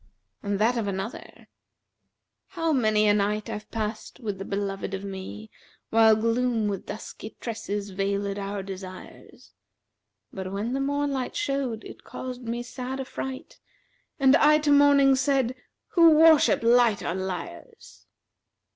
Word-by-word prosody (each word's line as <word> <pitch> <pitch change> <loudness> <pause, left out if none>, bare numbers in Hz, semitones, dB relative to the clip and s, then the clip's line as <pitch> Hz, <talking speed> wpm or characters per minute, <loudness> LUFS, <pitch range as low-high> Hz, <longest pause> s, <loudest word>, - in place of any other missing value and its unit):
And 200 -1 -2
that 230 +4 +2
of 220 -3 -1
another, 195 +4 -6 1.0
'How 330 -4 -1
many 215 -5 +3
a 205 - +5
night 210 +1 -1
I've 210 - -7
passed 215 +2 -5
with 205 -6 -4
the 195 - -5
beloved 195 -1 -3
of 195 - -7
me, 200 +2 -8 0.2
* - - -35
While 220 -1 +6
gloom 230 0 0
with 200 -2 -4
dusky 215 0 -8
tresses 205 -3 -4
veilиd 200 +1 -2
our 200 0 -4
desires: 185 -1 -10 0.8
But 190 -1 -5
when 210 +5 -3
the 270 - -1
morn 285 +1 0
light 260 -2 -3
showed 275 - -2
it - - -11
caused 255 -1 -7
me 240 0 -4
sad 255 +2 -6
affright; 265 0 -6 0.3
* - - -43
And 270 0 +6
I 300 0 +5
to 300 -1 +1
Morning 285 -1 +6
said, 260 -2 +1 0.4
'Who 340 -5 +6
worship 315 -6 +5
light 235 -3 +4
are - - -2
liars!' 180 - -7
225 Hz, 145 wpm, -26 LUFS, 200-265 Hz, 1.0 s, While